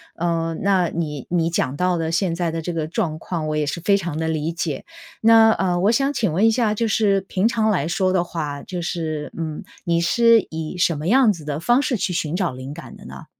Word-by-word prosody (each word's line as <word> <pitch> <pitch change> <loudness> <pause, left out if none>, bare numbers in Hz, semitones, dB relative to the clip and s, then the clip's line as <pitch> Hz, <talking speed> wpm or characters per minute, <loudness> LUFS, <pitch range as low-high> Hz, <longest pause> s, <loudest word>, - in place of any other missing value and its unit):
呃， 165 -1 -1
那 190 -3 +2
你 150 -5 -4
你 170 -1 +1
讲 140 -5 -1
到 180 +1 +1
的 160 -1 -2
现 165 +1 0
在 170 -1 -1
的 165 0 -3
这 175 - -4
个 160 -2 -2
状 165 -4 -2
况 160 -4 -4
我 150 - -1
也 150 - 0
是 150 +4 -4
非 200 +2 +3
常 170 -5 -4
地 160 0 -1
理 160 +1 -2
解。 160 -5 -4 0.3
那 225 0 +6
呃， 180 -4 0
我 205 +4 +4
想 275 +4 +1
请 215 - 0
问 200 +8 +3
一 - - +6
下 220 -2 +1
就 230 +2 -1
是 205 -2 +2
平 190 +1 -2
常 220 -2 +1
来 175 -8 +1
说 185 +2 0
的 175 -2 +2
话， 150 -5 -5
就 180 -2 -5
是， 160 -3 -4
嗯， 155 -2 -4 0.2
你 170 -1 +1
是 230 +6 +4
以 160 +2 -5
什 170 -3 +2
么 155 +3 -4
样 240 -1 +5
子 160 -4 -11
的 150 0 -3
方 240 +10 +3
式 260 -5 -1
去 180 - -2
寻 160 -2 -2
找 180 -6 -1
灵 130 +3 -7
感 - - -10
的 - - -14
呢？ - - -10
170 Hz, 260 characters per minute, -21 LUFS, 160-200 Hz, 0.3 s, 那